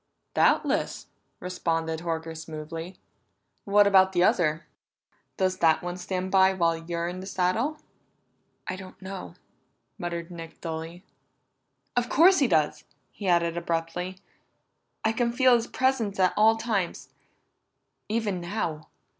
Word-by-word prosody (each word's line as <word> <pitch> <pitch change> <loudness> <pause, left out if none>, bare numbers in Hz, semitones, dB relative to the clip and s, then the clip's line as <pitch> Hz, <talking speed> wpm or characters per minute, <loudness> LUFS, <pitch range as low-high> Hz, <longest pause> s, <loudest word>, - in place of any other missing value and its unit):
"Doubtless," - - +2 0.3
responded 165 -3 -2
Horker 165 -1 -4
smoothly. 160 +2 -7 0.7
"What 205 +1 +5
about 190 -1 +5
the 175 -1 +3
other? 160 -3 +2 0.7
Does 185 -1 0
that 160 0 +3
one 175 0 -3
stand 185 +1 -3
by 190 0 +5
while 170 -3 +2
you're 170 +1 -3
in 180 +1 -5
the 190 - -8
saddle?" 200 +11 0 0.9
"I - - -3
don't 185 0 -11
know," 190 0 -8 0.6
muttered 170 0 -4
Nick 165 -1 -9
dully. 165 +2 -6 0.9
"Of 245 0 +1
course 360 +5 +6
he 275 - +4
does!" 155 -8 +1 0.3
he 200 - -6
added 170 -1 +2
abruptly. 170 +2 -3 0.9
"I 220 - +3
can 235 +1 0
feel 255 +1 +5
his 235 -1 +2
presence 245 -7 0
at 185 -1 +4
all 220 +2 +5
times 215 -6 -2 1.0
even 210 -5 -1
now. 175 -4 -3
180 Hz, 130 wpm, -27 LUFS, 165-205 Hz, 1.0 s, course